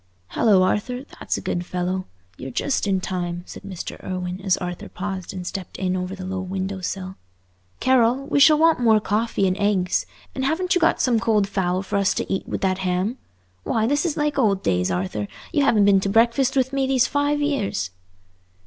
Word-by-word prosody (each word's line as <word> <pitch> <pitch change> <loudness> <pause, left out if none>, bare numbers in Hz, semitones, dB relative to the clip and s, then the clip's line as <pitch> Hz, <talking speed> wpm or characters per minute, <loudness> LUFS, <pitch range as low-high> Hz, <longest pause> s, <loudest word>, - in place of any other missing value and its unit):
"Hallo, 200 -5 +4
Arthur, 245 +7 -1 0.2
that's - - -2
a - - -5
good 175 - -2
fellow! 180 +1 -3 0.3
You're 130 - -7
just 235 - -1
in 190 -2 +1
time," 175 -2 -3
said - - -10
Mr. 195 -3 -7
Irwine, 185 0 -4
as 190 -2 +2
Arthur 180 -1 -6
paused 190 -1 -5
and 185 -2 -6
stepped 185 0 -6
in 185 -1 -1
over 185 +1 -3
the 185 -1 -7
low 190 0 -3
window 190 +1 -4
sill. 190 +1 -5 0.6
"Carroll, 260 +1 +3
we 285 - +1
shall 305 +2 +7
want 325 -2 +4
more 225 -3 +5
coffee 210 0 0
and 185 - +1
eggs, 185 - +1 0.3
and 265 - -3
haven't 335 +6 +1
you 360 - +1
got 330 - +3
some 240 -3 +2
cold 215 -3 +2
fowl 185 -1 -1
for 195 - -2
us 200 -1 +2
to - - -2
eat 190 - -3
with - - -3
that 185 -1 +1
ham? 190 +6 -1 0.4
Why, 220 - 0
this 290 +5 +1
is 340 -5 -1
like 295 -1 0
old 200 -6 +2
days, 90 0 +1
Arthur; 95 +3 -2 0.3
you 290 -3 +3
haven't 215 -7 +4
been 200 -1 +5
to 195 - -1
breakfast 235 +5 +3
with 260 0 +1
me 270 -1 +1
these 260 -2 +3
five 290 0 0
years." 205 - -1
195 Hz, 205 wpm, -23 LUFS, 185-255 Hz, 0.6 s, shall